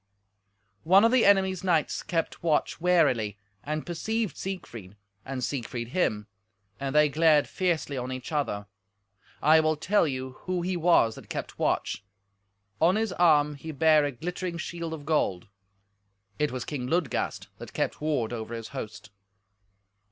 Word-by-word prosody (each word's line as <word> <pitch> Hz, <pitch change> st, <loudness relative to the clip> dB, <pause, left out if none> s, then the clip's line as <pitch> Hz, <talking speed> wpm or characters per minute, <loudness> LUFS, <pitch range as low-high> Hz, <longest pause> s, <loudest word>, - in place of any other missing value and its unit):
One 190 Hz, +6 st, +6 dB
of 230 Hz, -, +4 dB
the 255 Hz, -2 st, +4 dB
enemy's 190 Hz, -2 st, +3 dB
knights 170 Hz, -5 st, +1 dB
kept 165 Hz, -2 st, -2 dB
watch 160 Hz, 0 st, 0 dB
warily, 140 Hz, -, +2 dB, 0.3 s
and 155 Hz, +1 st, -3 dB
perceived 215 Hz, +2 st, -2 dB
Siegfried, 120 Hz, -, -7 dB, 0.3 s
and 130 Hz, -2 st, -5 dB
Siegfried 120 Hz, -3 st, -3 dB
him, 110 Hz, -, 0 dB, 0.5 s
and 135 Hz, +1 st, -3 dB
they 150 Hz, 0 st, +6 dB
glared 150 Hz, 0 st, +4 dB
fiercely 165 Hz, -7 st, -1 dB
on 125 Hz, +1 st, -4 dB
each 130 Hz, +1 st, -6 dB
other. 140 Hz, -9 st, -1 dB, 0.8 s
I 155 Hz, +2 st, +7 dB
will 155 Hz, 0 st, +2 dB
tell 190 Hz, +2 st, +2 dB
you 130 Hz, -2 st, -4 dB, 0.2 s
who 180 Hz, -1 st, -1 dB
he 185 Hz, +1 st, -1 dB
was 165 Hz, -10 st, +4 dB
that -, -, -13 dB
kept -, -, -6 dB
watch. -, -, 0 dB, 0.8 s
On 175 Hz, +4 st, +5 dB
his 220 Hz, -3 st, 0 dB
arm 150 Hz, -4 st, +4 dB
he 160 Hz, +3 st, -7 dB
bare 155 Hz, 0 st, +4 dB
a 145 Hz, -, 0 dB
glittering 175 Hz, +6 st, -4 dB
shield 170 Hz, -1 st, -5 dB
of 145 Hz, -2 st, -11 dB
gold. 145 Hz, -, 0 dB, 0.9 s
It 150 Hz, 0 st, +1 dB
was 125 Hz, -2 st, -4 dB
King 130 Hz, -5 st, -4 dB
Ludgast 165 Hz, 0 st, -1 dB
that -, -, -10 dB
kept -, -, -2 dB
ward 140 Hz, -7 st, -1 dB
over 115 Hz, 0 st, -5 dB
his 115 Hz, -1 st, -7 dB
host. 110 Hz, -4 st, -8 dB
155 Hz, 150 wpm, -27 LUFS, 130-175 Hz, 0.9 s, I